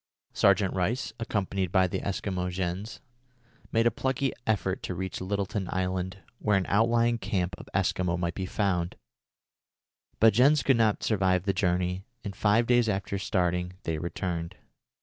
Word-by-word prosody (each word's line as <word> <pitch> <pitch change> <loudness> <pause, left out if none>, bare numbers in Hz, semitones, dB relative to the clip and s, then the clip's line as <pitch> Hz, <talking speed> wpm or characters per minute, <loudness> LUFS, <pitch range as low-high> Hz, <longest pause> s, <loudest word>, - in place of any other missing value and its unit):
Sergeant 100 -1 +3
Rice, 100 +8 -1
accompanied 95 -5 -1
by 95 -1 +4
the 90 - -2
Eskimo 95 -2 -2
Jens, 90 +3 -4 0.7
made 115 +1 +2
a 120 - +5
plucky 130 +3 -1
effort 95 -3 0
to 90 - -4
reach 95 +1 -4
Littleton 100 0 -2
Island, 95 +1 -2 0.2
where 105 -2 +2
an 95 - 0
outlying 115 +2 +3
camp 90 -4 -1
of - - -11
Eskimo 90 -2 +1
might 85 -1 -1
be 95 +1 -4
found; 90 -5 -1 1.2
but 110 0 +6
Jens 135 +6 +5
could 135 -3 +4
not 110 -2 +2
stand 95 -4 +2
the 100 0 +1
journey, 90 0 0 0.2
and, 100 -3 -5
five 110 +3 +3
days 120 -1 +3
after 100 0 -2
starting, 90 -2 0
they 80 -1 -2
returned. 85 0 -3
95 Hz, 150 wpm, -28 LUFS, 90-110 Hz, 1.2 s, but